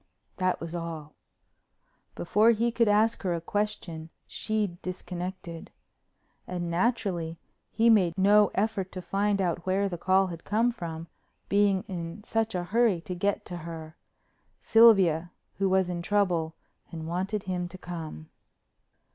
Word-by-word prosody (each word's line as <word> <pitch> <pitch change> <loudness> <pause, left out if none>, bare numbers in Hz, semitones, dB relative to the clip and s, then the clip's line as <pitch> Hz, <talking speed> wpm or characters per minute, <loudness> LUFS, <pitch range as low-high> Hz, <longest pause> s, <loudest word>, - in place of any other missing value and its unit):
That 185 -1 0
was 165 0 -6
all. 165 -3 -6 1.0
Before 210 +6 +3
he 235 +1 +2
could 230 -1 +2
ask 215 +2 +3
her 180 -3 0
a - - -2
question 170 -4 -3 0.2
she'd 210 -5 -2
disconnected. 180 -2 -6 0.8
And, 175 -2 -3
naturally, 175 -4 0 0.3
he 230 +1 +2
made 190 -7 +4
no 205 +1 +5
effort 195 -2 -1
to 185 - -5
find 200 +1 0
out 175 -1 -1
where 195 +2 +2
the 175 -3 -5
call 190 +2 +3
had 170 -3 -7
come 225 +4 +2
from, 165 -7 -6 0.4
being 200 -2 +3
in 170 +2 -6
such 225 -1 -1
a 180 - -1
hurry 215 0 +2
to 180 - -6
get 200 +3 -1
to 175 - -6
her—Sylvia 170 +3 +1 0.3
who 195 -1 +2
was 190 -1 +3
in 175 -1 -3
trouble 175 -5 +1 0.4
and 160 -1 -6
wanted 190 +4 -2
him 180 -1 -2
to 180 +2 -10
come. 165 - -8
185 Hz, 140 wpm, -28 LUFS, 170-205 Hz, 1.0 s, no